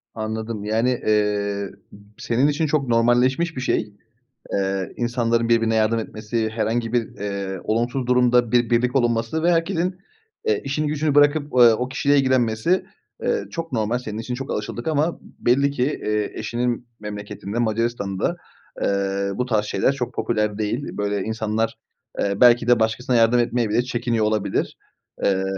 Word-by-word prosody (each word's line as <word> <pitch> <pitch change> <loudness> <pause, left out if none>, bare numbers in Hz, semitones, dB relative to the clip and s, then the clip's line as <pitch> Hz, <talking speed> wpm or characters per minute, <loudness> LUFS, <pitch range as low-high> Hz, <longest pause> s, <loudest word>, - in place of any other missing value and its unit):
Anladım. 110 -1 -4
Yani, 110 +4 +1 0.2
eee, 105 -1 +1
ı - - -9 0.5
senin 125 +4 +1
için 150 +2 +1
çok 145 -3 0
normalleşmiş 125 +8 +2
bir 125 - -4
şey, 105 -4 -1 0.6
eee, 95 -1 -1
insanların 120 -1 0
birbirine 115 -1 +3
yardım 110 +1 +2
etmesi, 110 +1 -3
herhangi 115 +1 -1
bir, 120 -2 +1
eee, 100 -2 -4
olumsuz 120 +3 -1
durumda 125 -2 +3
bir 120 -2 +3
birlik 120 +2 +1
olunması 120 +4 +1
ve 175 - +4
herkesin, 175 +2 0 0.5
eee, 445 - +1
işini 150 +2 -1
gücünü 150 -1 0
bırakıp, 145 +1 +5
eee, 120 -3 +7
o 125 +3 -2
kişiyle 140 +2 +2
ilgilenmesi, 130 +4 +2 0.4
eee, 470 - 0
çok 165 -2 -5
normal. 115 0 0
Senin 110 -4 -6
için 120 +2 -4
çok 135 +1 -6
alışıldık 120 +5 -4
ama 155 +2 0
belli 140 +4 +1
ki, 130 -3 -1
eee, 105 -6 -1
eşinin 120 0 -2
memleketinde 105 +1 -6
Macaristan'da, 115 - -1 0.5
eee, 100 0 0
bu 125 - -1
tarz 110 -4 +1
şeyler 130 - +1
çok 125 -3 -4
popüler 105 -3 -1
değil. 110 +6 -3
Böyle 100 -1 -1
insanlar, 110 0 -2 0.4
eee, 100 0 -1
belki 120 -1 +6
de 120 -1 +5
başkasına 115 +3 0
yardım 115 +1 +4
etmeye 120 -1 +1
bile 110 +3 +2
çekiniyor 120 -3 -1
olabilir. 105 -2 -1 0.5
Eee, 95 -1 +2
115 Hz, 155 wpm, -22 LUFS, 110-125 Hz, 0.6 s, eee